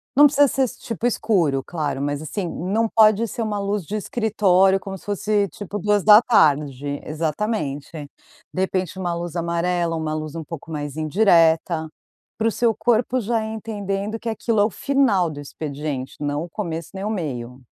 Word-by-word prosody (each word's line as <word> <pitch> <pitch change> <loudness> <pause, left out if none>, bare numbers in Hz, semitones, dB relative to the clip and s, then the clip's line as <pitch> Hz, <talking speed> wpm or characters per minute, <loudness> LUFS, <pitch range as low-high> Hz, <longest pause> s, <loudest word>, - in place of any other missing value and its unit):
Não 290 - +8
precisa 290 0 +5
ser 265 -2 0
tipo 230 +1 -3
escuro, 170 - +1
claro, 145 -5 -3
mas 145 +1 -2
assim, 180 +5 -4
não 210 +7 -1
pode 215 0 +5
ser 235 - -5
uma 210 -1 -2
luz 200 -3 -2
de 210 - -4
escritório, 195 -4 +2
como 195 0 -7
se - - -19
fosse, 205 0 0
tipo, 205 +3 -6
14h. 155 - +4
Exatamente. 155 -2 -3 0.5
De 185 - -1
repente, 185 -1 -2
uma 175 -2 -1
luz 170 0 -5
amarela, 170 0 0
uma 155 -1 -2
luz 155 0 -5
um 165 - -4
pouco 165 +1 -9
mais 145 -1 -5
indireta, 165 -1 +3 0.5
para 225 +1 +1
o - - +2
seu 230 -1 +1
corpo 240 +2 +1
já 225 +1 0
ir 220 - -5
entendendo 210 -1 -4
que 235 - -8
aquilo 225 0 -1
é 205 - +5
o - - 0
final 220 -9 +2
do 145 -1 -8
expediente, 145 -2 -5
não 145 +1 -2
o 175 - -8
começo, 165 -5 -5
nem 195 +1 -5
o - - -1
meio. 130 - -4
185 Hz, 175 wpm, -22 LUFS, 155-215 Hz, 0.5 s, Não